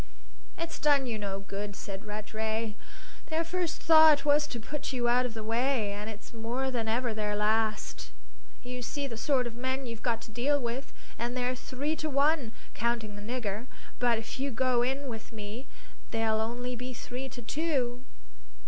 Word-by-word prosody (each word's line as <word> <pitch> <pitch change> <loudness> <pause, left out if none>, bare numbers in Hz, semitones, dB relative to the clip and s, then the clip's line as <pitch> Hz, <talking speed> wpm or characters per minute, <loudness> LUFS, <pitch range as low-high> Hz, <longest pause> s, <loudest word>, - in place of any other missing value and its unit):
"It's 335 0 -3
done 285 -3 +4
you 230 -3 -2
no 195 -1 -2
good," 200 +1 -4
said 195 +2 -6
Rattray. 220 +1 -2 0.5
"Their 320 +1 +1
first 345 -1 -1
thought 315 -3 +8
was 295 +1 +5
to 240 - -4
put 295 +6 -4
you 245 -2 +1
out 250 +1 +4
of 230 - -9
the 220 - -4
way, 230 -1 +1
and 205 +2 -4
it's 215 +1 -9
more 240 +4 -1
than 230 -3 -1
ever 235 +1 +1
their 210 -1 0
last. 215 +1 +1 0.5
You 250 0 -5
see 285 +3 -2
the 245 -4 -4
sort 255 +2 +2
of 240 - -3
men 260 +3 -1
you've 230 -2 -5
got 230 -2 +1
to 220 - -10
deal 275 +6 +2
with; 245 +2 -3 0.3
and 240 +2 -1
they're 250 0 +1
three 275 +4 -2
to 310 - -1
one, 280 -3 +3 0.2
counting 225 -1 0
the 205 - -7
nigger; 225 0 -2 0.3
but 240 -2 +4
if 225 +3 -5
you 275 +1 +1
go 255 -1 +3
in 270 +3 0
with 225 -2 -6
me 220 +4 -6 0.4
they'll 225 -1 +2
only 245 +2 -2
be 250 +1 -5
three 255 +3 -5
to 245 -1 -8
two." 260 -3 0
240 Hz, 185 wpm, -31 LUFS, 220-265 Hz, 0.5 s, thought